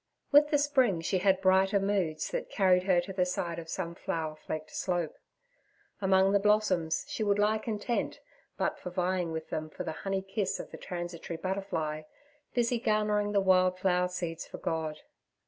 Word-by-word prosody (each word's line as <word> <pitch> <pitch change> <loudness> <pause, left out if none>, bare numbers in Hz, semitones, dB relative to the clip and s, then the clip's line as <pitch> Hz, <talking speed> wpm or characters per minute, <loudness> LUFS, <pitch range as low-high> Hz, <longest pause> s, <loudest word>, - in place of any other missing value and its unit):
With 295 +1 +7
the 295 - +3
spring 260 - +2
she 185 +3 0
had 190 0 +3
brighter 190 +1 +4
moods 195 -6 -1
that - - -3
carried 185 -3 +4
her 185 -3 +4
to 195 +2 -7
the 185 -1 +2
side 175 -2 -2
of 165 -1 -9
some 170 -1 -3
flower 165 -4 -3
flecked 155 0 -6
slope. 175 -4 -1 0.9
Among 190 0 +4
the 200 - +4
blossoms 195 -6 +2
she - - -4
would 205 -1 +2
lie 210 +1 +2
content 225 +2 -2 0.4
but - - -1
for - - -6
vying 180 -1 -1
with 160 0 -5
them 155 0 -3
for - - -6
the - - -3
honey 195 -1 -1
kiss 195 0 -2
of - - -7
the - - -8
transitory 175 -1 -5
butterfly, 165 -5 -2 0.5
busy 240 0 +2
garnering 210 -2 +1
the 205 - +3
wild 185 -1 +4
flower 180 -1 +2
seeds 170 -2 -4
for - - -8
God. 160 -2 -3
185 Hz, 180 wpm, -30 LUFS, 170-205 Hz, 0.9 s, With